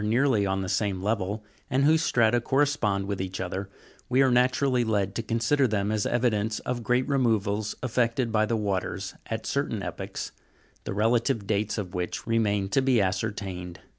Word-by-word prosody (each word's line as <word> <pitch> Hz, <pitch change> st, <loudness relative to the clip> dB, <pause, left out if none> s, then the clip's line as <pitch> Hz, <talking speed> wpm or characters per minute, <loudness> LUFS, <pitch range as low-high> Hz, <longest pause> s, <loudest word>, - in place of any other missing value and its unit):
nearly 115 Hz, -1 st, +2 dB
on 95 Hz, 0 st, 0 dB
the 95 Hz, -, -3 dB
same 100 Hz, -2 st, 0 dB
level, 105 Hz, +1 st, -1 dB, 0.3 s
and 135 Hz, 0 st, +2 dB
whose 160 Hz, +1 st, +4 dB
strata 120 Hz, -5 st, +3 dB
correspond 135 Hz, -8 st, +1 dB
with 100 Hz, -1 st, -3 dB
each 95 Hz, 0 st, -4 dB
other, 95 Hz, +1 st, -4 dB, 0.4 s
we 130 Hz, +2 st, +4 dB
are 130 Hz, -, +3 dB
naturally 125 Hz, +1 st, +3 dB
led 100 Hz, -4 st, 0 dB
to 115 Hz, -, -2 dB
consider 115 Hz, +5 st, +1 dB
them 105 Hz, -2 st, 0 dB
as 110 Hz, -1 st, 0 dB
evidence 110 Hz, -3 st, +1 dB
of 125 Hz, -1 st, -3 dB
great 125 Hz, +3 st, +1 dB
removals 110 Hz, -6 st, +1 dB
effected 120 Hz, 0 st, 0 dB
by 110 Hz, -1 st, +2 dB
the 115 Hz, -, 0 dB
waters, 100 Hz, -3 st, -2 dB
at -, -, -4 dB
certain -, -, -1 dB
epochs, -, -, -5 dB, 0.5 s
the -, -, -3 dB
relative 115 Hz, +1 st, +1 dB
dates 105 Hz, +1 st, 0 dB
of 95 Hz, -4 st, -4 dB
which 90 Hz, -1 st, -3 dB
remain 105 Hz, -4 st, +1 dB
to 135 Hz, +7 st, +2 dB
be 130 Hz, -3 st, +3 dB
ascertained. 95 Hz, -3 st, -2 dB
110 Hz, 170 wpm, -27 LUFS, 100-125 Hz, 0.5 s, whose